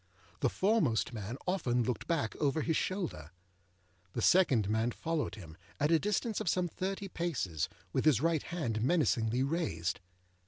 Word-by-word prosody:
The 130 - +2
foremost 175 - +1
man 110 +2 -5
often 125 -10 +1
looked 125 +1 -2
back 155 -10 0
over 150 +1 +1
his 160 - +1
shoulder. 175 - -2 0.8
The 120 - -2
second 135 - +4
man 110 +3 +1
followed 160 +5 -2
him, 85 -7 -11 0.2
at 150 +2 +2
a 165 - +5
distance 210 +3 -1
of - - 0
some 180 +2 +1
thirty 195 +4 -3
paces, 145 - -2 0.2
with - - +1
his 150 -7 +5
right 165 0 +2
hand 125 -11 -2
menacingly 125 -4 +2
raised. 135 - -1
145 Hz, 155 wpm, -32 LUFS, 115-175 Hz, 0.8 s, a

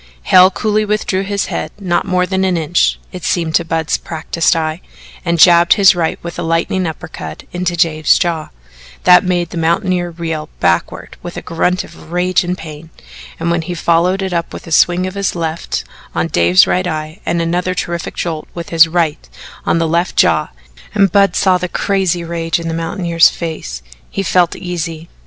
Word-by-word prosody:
Hale 185 0 +6
coolly 215 +2 0
withdrew 210 -2 -1
his 200 0 -2
head - - -4
not 185 -1 -1
more 180 -1 +1
than 190 0 -1
an 185 -2 +1
inch, 165 +2 +1
it 180 -2 -8
seemed 165 0 -1
to 170 - +3
Budd's 160 -1 -1
practised 165 +1 -1
eye, 160 +1 -2 0.4
and 170 -2 0
jabbed 170 +1 +6
his 200 -3 +6
right 165 -2 -1
with 170 0 -6
a - - -1
lightning 165 +2 0
uppercut 160 0 -7
into 175 -1 -2
Dave's 155 -2 +3
jaw, 165 -4 -1 0.5
that 180 +1 +7
made 175 -3 -1
the 170 - -4
mountaineer 175 +2 0
reel 165 -2 -5
backward 85 - -1
with - - -8
a - - -6
grunt 180 +3 0
of 160 - -14
rage 180 +2 +1
and 180 +1 -3
pain, 155 -1 -10 0.5
and 170 - -1
when 170 -1 +1
he 175 +2 -5
followed 175 +3 +1
it 190 -1 -3
up 170 -1 -2
with - - -8
a 165 - -10
swing 175 +3 +3
of 185 - -4
his 200 -2 -2
left 165 -1 -3 0.3
on 85 - +1
Dave's 85 +2 +5
right 180 0 0
eye 155 +2 -4
and 170 - -1
another 175 +2 -1
terrific 170 -2 -4
jolt 160 -3 -4
with 170 -1 -6
his 165 0 +6
right 165 -2 -1 0.4
on - - +2
the 165 -1 +1
left 170 +3 0
jaw, - - +3 0.5
and 195 -3 +3
Budd 200 +1 +3
saw 185 -2 +3
the 180 0 -3
crazy 190 -3 0
rage 165 0 -2
in 165 - -5
the 165 - -2
mountaineer's 165 0 +2
face, 155 - -6 0.3
he 195 - -3
felt 180 -2 +2
easy. 170 -2 -5
170 Hz, 190 wpm, -16 LUFS, 165-185 Hz, 0.5 s, that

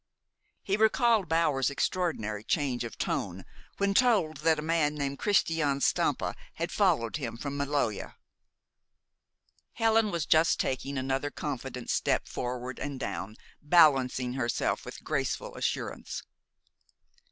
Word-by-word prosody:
He 195 +1 0
recalled 220 -3 +3
Bower's 155 -5 +2
extraordinary 140 - -1
change 130 -2 0
of 115 - -7
tone - - -2 0.3
when 200 0 +1
told 200 - +3
that 160 +2 +2
a 150 - -4
man 155 -2 +1
named 140 -1 -3
Christian 160 -8 +2
Stampa - - +1 0.2
had - - -3
followed 115 +3 +2
him 115 -6 -5
from 140 +3 -4
Maloja. 140 -6 -1 1.6
Helen 225 -1 +3
was 170 -6 -2
just 160 +1 +4
taking 135 +2 -2
another 135 +2 -1
confident 135 -4 -5
step - - +1
forward 125 +1 -4
and 140 -2 -4
down, 100 -1 -4 0.3
balancing 135 -6 +4
herself 120 -3 -1
with - - -9
graceful - - -2
assurance. - - -3
145 Hz, 120 wpm, -29 LUFS, 130-165 Hz, 1.6 s, just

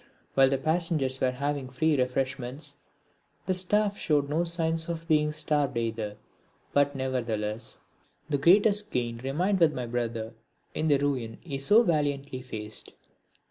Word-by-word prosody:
While 135 -1 +5
the 135 - +1
passengers 155 -3 0
were 130 - +3
having 140 +1 -3
free 150 +5 +1
refreshments, 130 +1 -2 0.7
the 185 - +1
staff 205 +3 +2
showed 145 -3 +1
no 160 +4 +1
signs 165 -1 +1
of 165 -1 -5
being 150 -2 +3
starved 150 -4 0
either, 110 -2 -3 0.6
but 145 0 +3
nevertheless 115 -4 -2 0.5
the 145 -2 0
greatest 205 +6 +5
gain 120 -2 -2
remained 175 +10 0
with 165 -3 +4
my 125 - -3
brother 115 -1 -3 0.4
in 155 - -1
the 145 -2 +5
ruin 130 -5 -2
he 140 -5 -4
so 205 +12 +5
valiantly 145 - -1
faced. 110 -4 -6
140 Hz, 140 wpm, -28 LUFS, 125-160 Hz, 0.7 s, While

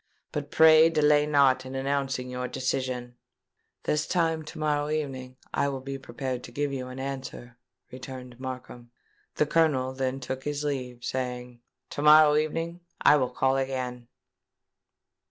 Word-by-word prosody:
But 145 -1 -4
pray 160 +1 +7
delay 150 -2 +3
not 140 -3 +4
in 130 +1 -8
announcing 135 -1 -1
your 125 0 -4
decision." 130 -2 -3 0.7
"This 150 0 0
time 165 -3 +1
to - - -9
morrow 150 -1 0
evening 130 -4 -4 0.2
I 140 - +1
will 135 -1 -4
be 135 +1 -6
prepared 130 0 -5
to - - -11
give 145 +2 -2
you 130 -1 -4
an 130 0 -8
answer," 130 -3 -6 0.3
returned 125 -1 -9
Markham. 125 -2 -7 0.5
The 150 - +2
Colonel 145 -5 +2
then 130 0 -2
took 130 0 -5
his 145 0 -3
leave, 125 -4 -4
saying, 125 -2 -4 0.3
"To - - -4
morrow 150 0 +7
evening 165 +3 -1 0.2
I - - +6
will 130 -3 0
call 130 0 +1
again." 130 -2 -3
135 Hz, 150 wpm, -27 LUFS, 125-150 Hz, 0.7 s, pray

